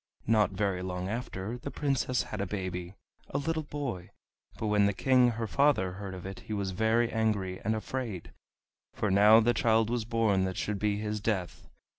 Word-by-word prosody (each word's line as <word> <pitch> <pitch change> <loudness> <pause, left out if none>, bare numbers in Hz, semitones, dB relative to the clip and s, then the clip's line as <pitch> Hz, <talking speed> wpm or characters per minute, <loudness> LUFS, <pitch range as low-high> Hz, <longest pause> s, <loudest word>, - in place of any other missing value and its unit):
Not 105 -3 +3
very 95 -1 -1
long 90 0 -3
after, 115 0 -4
the 140 - -6
Princess 135 -4 0
had - - -5
a 100 - -2
baby, 90 -2 -4 0.3
a - - -2
little 160 +3 -1
boy, 140 - -5 0.5
but - - -4
when 105 -1 +3
the 100 - +1
King 125 +3 +4
her 115 0 -3
father 140 -6 +2
heard 95 0 -7
of 90 - -9
it 95 0 -6
he 110 - -7
was 100 -2 -2
very 110 +4 +2
angry 105 -5 0
and 110 +2 0
afraid, 110 -5 -5 0.6
for 105 - 0
now 105 +3 +7
the 120 +1 +3
child 110 0 +2
was 120 -2 0
born 110 -4 +1
that 95 0 -3
should 105 -1 -2
be 105 0 +1
his 105 0 -3
death. 95 -5 -2
105 Hz, 190 wpm, -30 LUFS, 95-115 Hz, 0.6 s, now